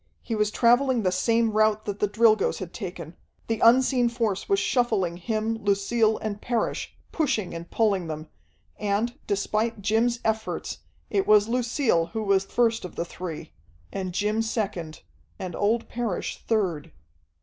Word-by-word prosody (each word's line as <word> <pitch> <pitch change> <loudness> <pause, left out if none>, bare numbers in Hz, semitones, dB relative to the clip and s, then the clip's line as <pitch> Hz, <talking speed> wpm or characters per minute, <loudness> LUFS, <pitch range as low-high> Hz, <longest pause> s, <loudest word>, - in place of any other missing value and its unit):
He 230 - -4
was 210 -1 +1
traveling 245 +1 +3
the 185 - +2
same 230 +5 +2
route 215 0 +2
that 205 -1 -4
the 210 - +2
Drilgoes 220 0 +3
had 180 -3 -7
taken. 175 -5 -7 0.3
The 225 -1 -2
unseen 245 +1 +5
force 225 -5 -2
was 395 - +4
shuffling 215 - +1
him, 220 +4 -2
Lucille, 215 +2 +2
and 210 -1 -5
Parrish, 240 -2 -2 0.2
pushing 225 - -1
and 170 0 -7
pulling 200 -6 +1
them. 155 0 -6 0.5
And, 210 +3 0
despite 215 +2 -1
Jim's 230 +3 +2
efforts, 220 0 -2 0.3
it 390 - +1
was 210 0 +6
Lucille 235 - +1
who 220 -1 -2
was 195 -1 +2
first 230 +2 +1
of 180 - -8
the 170 - -2
three... 165 -3 -7 0.4
and 185 -2 -3
Jim 210 +4 0
second... 195 -8 -3 0.3
and 180 -2 -5
old 220 +3 +1
Parrish 230 -6 -3
third.... 185 -10 0
215 Hz, 150 wpm, -26 LUFS, 190-230 Hz, 0.5 s, was